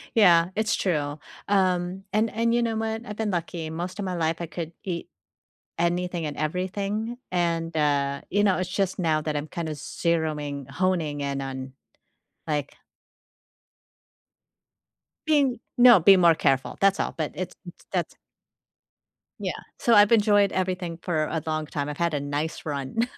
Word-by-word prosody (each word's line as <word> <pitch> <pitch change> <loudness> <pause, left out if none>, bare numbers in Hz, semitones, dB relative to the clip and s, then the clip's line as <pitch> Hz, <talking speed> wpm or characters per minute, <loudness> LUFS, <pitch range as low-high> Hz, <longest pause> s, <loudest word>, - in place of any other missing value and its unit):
Yeah, 170 -6 +6
it's 220 0 +1
true. 150 -5 -1 0.3
Um, 185 -1 +1
and 215 +2 +2
and 230 +1 +1
you 240 - +3
know 230 -1 -1
what, 225 +1 -2
I've 210 - -6
been 220 -2 -1
lucky, 170 -2 -3
most 175 +5 -5
of 200 - -2
my 185 -1 -2
life 165 -1 0
I 170 - -3
could 165 +1 -6
eat 175 -3 -4 0.7
anything 175 0 0
and 145 -1 -4
everything, 195 +8 -2
and, 170 -2 0
uh, 140 -2 +1
you 205 +2 +2
know, 195 -3 +3
it's 185 -1 -2
just 190 0 -1
now 160 -3 +2
that 155 -1 -3
I'm 145 +1 -2
kinda 160 0 -4
zeroing 150 -3 -2
honing 160 -1 0
in 140 -1 -2
on, 130 -1 -6 0.7
like 145 -2 -2 2.5
Being 280 -6 +3 0.2
No, 240 -4 +8
being 190 +3 +7
more 170 -2 +6
careful, 135 -3 +1
that's 195 0 +4
all, - - -1
but - - -2
it's - - -5
s - - -8 0.2
that's - - -2 1.3
Yeah, - - -1 0.2
so, 235 - +2
I've 205 0 +7
enjoyed 205 -3 +4
everything 185 -2 -2
for 160 -4 0
a 160 - -2
long 155 -1 -1
time, 145 -1 -3
I've 150 0 -5
had 170 -1 0
a 145 - 0
nice 145 +3 -3
run. 145 - -1
170 Hz, 160 wpm, -26 LUFS, 155-200 Hz, 2.5 s, No